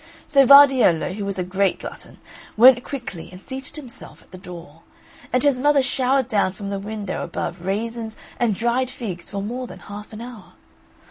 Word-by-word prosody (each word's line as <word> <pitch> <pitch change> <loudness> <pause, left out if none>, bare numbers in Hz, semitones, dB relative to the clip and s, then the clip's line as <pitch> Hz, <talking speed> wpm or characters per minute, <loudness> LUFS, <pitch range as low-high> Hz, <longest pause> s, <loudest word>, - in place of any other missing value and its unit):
So 275 -3 +4
Vardiello, 265 - +6
who 205 +1 -5
was 200 -1 -2
a 180 - 0
great 190 +2 0
glutton, - - -10 0.4
went 245 +2 +7
quickly 240 - -7
and 180 - -11
seated 265 +6 -7
himself 265 -6 -9
at - - -28
the 185 - -10
door; 170 -4 -11 0.5
and 250 0 +3
his 280 -3 +3
mother 290 0 +3
showered 260 0 +1
down 200 -6 +1
from 200 +1 -7
the 200 - -3
window 205 -1 -5
above 175 +1 -5
raisins 225 +2 -3 0.2
and 230 -4 +1
dried 240 +4 0
figs 185 -10 -6
for 200 -1 -4
more 245 +4 -5
than - - -11
half 205 0 -10
an 215 - -9
hour. 235 -4 -11
220 Hz, 185 wpm, -22 LUFS, 195-255 Hz, 0.5 s, went